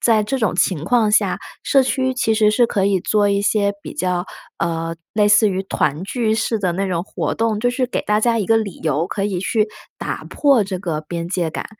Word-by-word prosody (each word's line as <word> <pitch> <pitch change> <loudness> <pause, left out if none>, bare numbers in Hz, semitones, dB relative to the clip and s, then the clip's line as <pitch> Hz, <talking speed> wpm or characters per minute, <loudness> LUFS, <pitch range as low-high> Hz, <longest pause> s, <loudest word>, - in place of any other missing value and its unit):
在 225 -2 +3
这 265 +6 -2
种 220 -7 0
情 170 -5 +1
况 225 +2 +2
下， - - +2 0.3
社 275 - +4
区 260 0 0
其 250 -3 +1
实 215 -1 +4
是 240 +2 +4
可 195 -4 0
以 195 -1 +2
做 205 +2 +2
一 200 0 +1
些 205 0 +2
比 - - -7
较， 180 +2 -1 0.3
呃， 165 0 -2 0.2
类 210 -1 +3
似 210 +1 +5
于 190 -1 -2
团 150 -4 -1
聚 220 +1 0
式 220 +1 0
的 185 -4 0
那 195 +3 -1
种 170 -2 -1
活 - - -3
动， 220 -2 0
就 245 - +2
是 255 +1 -1
给 245 - -2
大 210 0 +1
家 230 +1 +2
一 205 - -1
个 225 - +4
理 210 -5 -3
由 155 +2 0
可 195 0 -3
以 200 -3 -1
去 215 +2 0 0.3
打 - - -4
破 275 -7 +2
这 190 -1 -4
个 170 -5 -3
边 170 +2 -5
界 175 -3 -1
感， - - -5
205 Hz, 250 characters per minute, -20 LUFS, 180-225 Hz, 0.3 s, 似